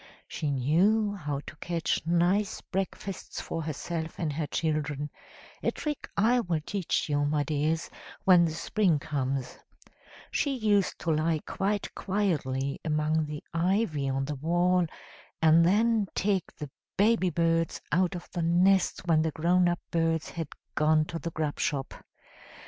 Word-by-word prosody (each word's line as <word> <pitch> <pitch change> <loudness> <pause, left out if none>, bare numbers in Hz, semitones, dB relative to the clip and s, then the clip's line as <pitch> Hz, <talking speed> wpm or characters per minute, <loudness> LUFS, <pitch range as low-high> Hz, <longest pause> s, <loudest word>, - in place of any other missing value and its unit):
She 150 - -3
knew 185 - +2
how 145 -7 -3
to - - -9
catch 170 -2 -1
nice 175 +4 +2
breakfasts 195 0 -4
for 165 - -4
herself 160 +1 -4
and 155 -4 -2
her 150 0 -2
children, 150 -2 -2 0.5
a - - +1
trick 295 -2 -4
I 235 +5 +4
will 175 -8 -1
teach 200 -4 -1
you, 145 -1 +1
my 145 0 +1
dears, 155 +2 0 0.4
when 180 -2 +6
the - - 0
spring 175 +1 +1
comes; 135 -3 -3 0.7
she 275 -3 0
used 205 -4 +2
to 165 - 0
lie 155 +1 +1
quite 200 +1 -2
quietly 145 -9 -1
among 155 0 +1
the 150 0 -6
ivy 170 -5 +1
on 135 0 -1
the 150 - -3
wall, 175 +4 +2 0.5
and 160 +1 +6
then 215 +3 +3
take 195 -3 0
the 145 -2 -7 0.3
baby 205 -2 +3
birds 165 0 +1
out 180 +3 +2
of 175 - -7
the 175 - -2
nest 180 +3 +3
when 160 -2 +4
the 160 - +1
grown 175 +3 +2
up 175 - -1
birds 165 -2 +1
had 165 -3 -4 0.3
gone 155 0 +3
to 165 +1 -5
the 170 - -4
grub 155 -2 -3
shop. 135 -2 -1
165 Hz, 150 wpm, -28 LUFS, 150-185 Hz, 0.7 s, when